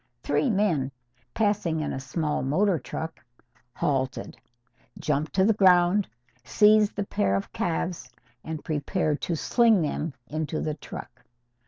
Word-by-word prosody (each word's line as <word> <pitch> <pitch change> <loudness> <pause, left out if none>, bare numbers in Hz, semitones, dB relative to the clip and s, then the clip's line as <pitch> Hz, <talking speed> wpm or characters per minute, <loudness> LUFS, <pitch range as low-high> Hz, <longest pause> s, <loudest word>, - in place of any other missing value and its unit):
Three 275 - +1
men, 185 - +1 0.4
passing 205 -7 +1
in 155 - -2
a - - -3
small 150 +3 -2
motor 170 +7 +2
truck, 160 +6 -6 0.5
halted, 130 -3 -1 0.6
jumped 150 +1 -1
to 190 -1 +3
the 225 - +4
ground, 185 0 +4 0.4
seized 210 - +4
the 205 - -2
pair 100 - 0
of 100 - -4
calves 170 -5 -2 0.3
and 160 -1 -6
prepared 155 0 -1
to 170 - -1
sling 225 +2 +3
them 150 -1 -3
into 155 +2 -3
the 155 - -2
truck. 130 -3 -10
160 Hz, 135 wpm, -26 LUFS, 145-200 Hz, 0.6 s, the